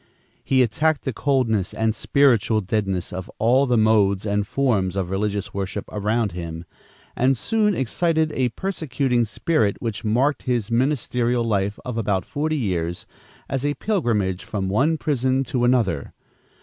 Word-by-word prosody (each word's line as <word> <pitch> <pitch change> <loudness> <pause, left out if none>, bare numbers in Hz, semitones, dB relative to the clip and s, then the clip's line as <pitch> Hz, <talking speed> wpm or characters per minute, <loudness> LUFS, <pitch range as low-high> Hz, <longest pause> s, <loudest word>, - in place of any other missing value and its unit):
He 130 -1 +3
attacked 150 +7 +1
the 130 - -2
coldness 115 -8 0
and 110 0 +1
spiritual 115 -4 +3
deadness 95 -3 -2
of 95 0 -6
all 130 +5 +3
the 125 -1 +2
modes 105 -3 +3
and 105 -1 0
forms 105 -10 0
of 95 -2 -2
religious 100 0 -2
worship 100 +1 -4
around 105 +1 0
him, 85 -1 -6 0.5
and 130 +1 +2
soon 210 - +1
excited 160 +4 0
a 130 -4 0
persecuting 135 -6 -1
spirit 110 -2 0
which 110 -4 -4
marked 125 +6 +1
his 120 -3 -1
ministerial 125 -2 +1
life 100 -2 0
of 125 -2 -3
about 100 -4 0
forty 155 +2 -2
years 85 - -2 0.4
as 135 -1 -2
a 145 0 0
pilgrimage 110 - 0
from 95 -2 -3
one 145 +11 +2
prison 130 -3 0
to 125 -1 -2
another. 110 - +1
115 Hz, 150 wpm, -23 LUFS, 100-135 Hz, 0.5 s, He